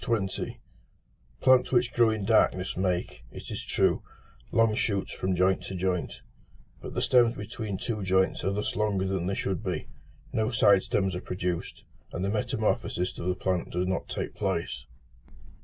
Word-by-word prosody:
Plants 130 Hz, -1 st, +5 dB
which 120 Hz, -1 st, +2 dB
grow 120 Hz, -2 st, +5 dB
in 110 Hz, -3 st, -1 dB
darkness 95 Hz, -4 st, +3 dB
make, 90 Hz, -9 st, -1 dB
it -, -, -9 dB
is -, -, -4 dB
true, -, -, +2 dB, 0.5 s
long 115 Hz, -1 st, +4 dB
shoots 100 Hz, -2 st, -1 dB
from 95 Hz, 0 st, -1 dB
joint 95 Hz, +1 st, +3 dB
to 95 Hz, -, -5 dB
joint: 90 Hz, -1 st, -2 dB, 0.6 s
but -, -, -8 dB
the -, -, 0 dB
stems 120 Hz, -2 st, +4 dB
between 105 Hz, -1 st, -5 dB
two 110 Hz, -1 st, -3 dB
joints 95 Hz, 0 st, +2 dB
are 95 Hz, -, +1 dB
thus 105 Hz, +1 st, -2 dB
longer 105 Hz, -3 st, +1 dB
than 95 Hz, -2 st, -1 dB
they 95 Hz, -, 0 dB
should 95 Hz, -3 st, -2 dB
be; -, -, -3 dB, 0.4 s
no 110 Hz, 0 st, +1 dB
side 100 Hz, -5 st, +5 dB
stems 95 Hz, -2 st, 0 dB
are 90 Hz, -, -4 dB
produced, 90 Hz, -2 st, -3 dB, 0.3 s
and 90 Hz, -, -2 dB
the -, -, 0 dB
metamorphosis 105 Hz, -3 st, -1 dB
of 85 Hz, -, -3 dB
the 90 Hz, -, +1 dB
plant 90 Hz, -1 st, -1 dB
does 90 Hz, +1 st, 0 dB
not 95 Hz, -1 st, -2 dB
take -, -, -3 dB
place. -, -, -2 dB
95 Hz, 165 wpm, -28 LUFS, 90-110 Hz, 0.6 s, Plants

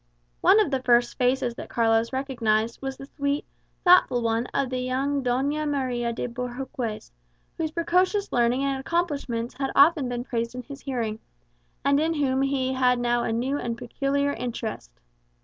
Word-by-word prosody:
One 420 Hz, -, +6 dB
of 415 Hz, -9 st, +2 dB
the 265 Hz, -1 st, 0 dB
first 240 Hz, -1 st, +3 dB
faces 250 Hz, -1 st, +1 dB
that -, -, -9 dB
Carlos 225 Hz, 0 st, +2 dB
recognized 235 Hz, -4 st, 0 dB
was 270 Hz, -1 st, -4 dB
the 275 Hz, -, -9 dB
sweet, 280 Hz, 0 st, -2 dB, 0.4 s
thoughtful 350 Hz, -9 st, +5 dB
one 230 Hz, +1 st, 0 dB
of 275 Hz, -2 st, -1 dB
the 255 Hz, -, -1 dB
young 265 Hz, +2 st, -1 dB
Doña 280 Hz, +5 st, 0 dB
Maria 250 Hz, -4 st, -1 dB
de 230 Hz, -, -3 dB
Bohorques, 245 Hz, -, -5 dB, 0.4 s
whose 320 Hz, -1 st, -2 dB
precocious 365 Hz, +5 st, +1 dB
learning 240 Hz, +2 st, +2 dB
and 275 Hz, -1 st, 0 dB
accomplishments 280 Hz, -7 st, -2 dB
had 270 Hz, -1 st, 0 dB
often 285 Hz, -2 st, +5 dB
been 245 Hz, 0 st, -3 dB
praised 235 Hz, -1 st, -3 dB
in 250 Hz, -, -5 dB
his 280 Hz, 0 st, -10 dB
hearing, 230 Hz, -5 st, -3 dB, 0.7 s
and 280 Hz, 0 st, +4 dB
in 320 Hz, +2 st, +1 dB
whom 270 Hz, -3 st, +1 dB
he 270 Hz, -1 st, 0 dB
had 250 Hz, -1 st, +3 dB
now 240 Hz, 0 st, +1 dB
a 230 Hz, -, -1 dB
new 260 Hz, +5 st, -1 dB
and 235 Hz, -1 st, -3 dB
peculiar 275 Hz, +3 st, -1 dB
interest. 225 Hz, -, -5 dB
260 Hz, 165 wpm, -25 LUFS, 240-280 Hz, 0.7 s, One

